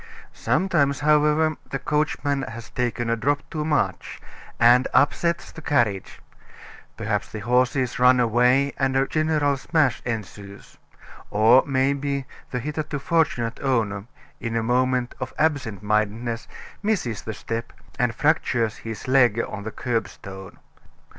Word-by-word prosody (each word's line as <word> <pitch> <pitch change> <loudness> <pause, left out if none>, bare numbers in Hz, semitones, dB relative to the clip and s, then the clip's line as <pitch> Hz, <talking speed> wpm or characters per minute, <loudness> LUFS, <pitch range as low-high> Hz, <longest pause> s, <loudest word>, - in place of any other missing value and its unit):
Sometimes, 145 -8 +1
however, 150 +1 +3
the 135 - -2
coachman 145 0 -1
has 115 -3 -8
taken 120 -1 -2
a 115 - +1
drop 145 +5 -1
too 155 -2 -2
much, 150 -1 -1 0.4
and 120 +2 +6
upsets 170 +4 +2
the 160 - -11
carriage; 115 -11 0 0.8
perhaps - - -2
the 110 - -6
horses 125 +2 +1
run 125 0 +6
away 125 +4 +3
and 135 -1 +1
a 135 - +3
general 155 -2 +1
smash 145 -2 +1
ensues; 100 -3 -7 0.5
or, 110 +5 +5
maybe, 140 0 0 0.2
the 125 - -3
hitherto 150 +3 -3
fortunate 140 -6 0
owner, 110 -7 0 0.3
in 115 -1 -4
a 115 - 0
moment 125 +1 +1
of 130 -1 -6
absent 135 - 0
mindedness, 110 +3 -1 0.3
misses 190 - -1
the 110 - -5
step, 115 +2 -5 0.3
and 120 -2 +1
fractures 120 -7 +1
his 110 +1 -7
leg 125 -4 +4
on 100 - -6
the 110 +2 -6
curbstone. 100 -6 -5
125 Hz, 130 wpm, -24 LUFS, 115-145 Hz, 0.8 s, and